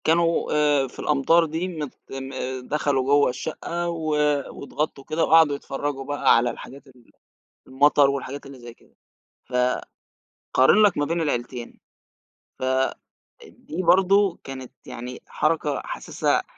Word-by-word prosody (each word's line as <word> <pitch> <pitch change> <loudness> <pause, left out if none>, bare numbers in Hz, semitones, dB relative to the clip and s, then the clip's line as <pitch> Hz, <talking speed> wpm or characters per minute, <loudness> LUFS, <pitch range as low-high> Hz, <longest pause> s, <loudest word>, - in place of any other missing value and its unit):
كانوا 165 +1 +2
آآ 145 -2 +3
في - - -15
الأمطار 150 +4 +3
دي 165 +3 -3
مت 155 -7 -5 0.2
م 135 0 -6 0.4
دخلوا 145 -3 0
جوّه 145 +1 +4
الشقّة 165 +6 -4
و 165 -2 -4 0.5
واتغطّوا 145 0 -4
كده 155 +1 +1
وقعدوا 160 -3 +5
يتفرّجوا 140 0 -4
بقى 145 +1 +3
على 120 +1 +2
الحاجات 140 +2 -11
ال 125 -3 -21 0.6
المطر 140 +1 +4
والحاجات 140 0 -5
اللي 135 -1 -11
زي 120 -1 -11
كده. - - -27 0.5
ف 125 - -16 1.0
قارن 135 +11 +5
لك 205 -4 +4
ما 145 - +1
بين 165 +3 -1
العيلتين، 120 -4 -4 0.8
ف - - -5
آآ 130 0 +1 0.5
دي 165 +4 -7
برضه 195 +1 +4
كانت 130 -2 -8 0.2
يعني 125 +1 -7
حركة 155 -2 0
حاسِسها - - -1
145 Hz, 140 wpm, -24 LUFS, 135-165 Hz, 1.0 s, وقعدوا